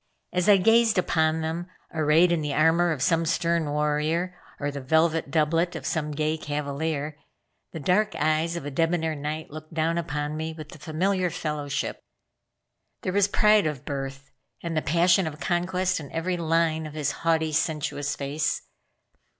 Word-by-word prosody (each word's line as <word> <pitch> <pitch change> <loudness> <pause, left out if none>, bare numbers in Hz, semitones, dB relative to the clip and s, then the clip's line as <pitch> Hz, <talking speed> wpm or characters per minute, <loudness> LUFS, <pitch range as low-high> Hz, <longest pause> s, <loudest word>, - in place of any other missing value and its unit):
As 180 +2 +2
I 205 - +8
gazed 225 +3 +4
upon 160 -2 +2
them, 165 +2 -3 0.3
arrayed 160 +2 +4
in 170 -2 +1
the 145 -2 -2
armor 165 +2 +4
of 140 -5 -1
some 165 +1 +3
stern 170 -2 0
warrior, 150 +4 0 0.2
or 145 0 -1
the 140 -1 -6
velvet 160 +2 +2
doublet 165 +3 +1
of - - -6
some 150 -2 -1
gay 155 +1 -1
cavalier, 150 +1 -3 0.5
the 160 - -6
dark 195 +8 +1
eyes 155 +2 +1
of 170 - -5
a 145 - -4
debonair 165 +2 +1
knight 150 +1 -5
looked 155 +2 -10
down 165 +1 +1
upon 150 -2 -3
me 160 +1 -3
with 155 -1 -10
familiar 180 +4 0
fellowship. 150 -3 -3 1.0
There 185 - -1
was 200 0 +4
pride 210 -3 +4
of 150 -4 -5
birth, 135 -1 -5 0.3
and 170 -1 -3
the 155 - +2
passion 175 +4 +3
of 150 -1 -6
conquest 180 +1 0
in 145 -3 -9
every 175 +3 -1
line 165 -1 +1
of 150 - -10
his 150 -2 0
haughty, 160 -1 +2
sensuous 150 -2 -1
face. 145 +2 -2
160 Hz, 165 wpm, -26 LUFS, 150-170 Hz, 1.0 s, I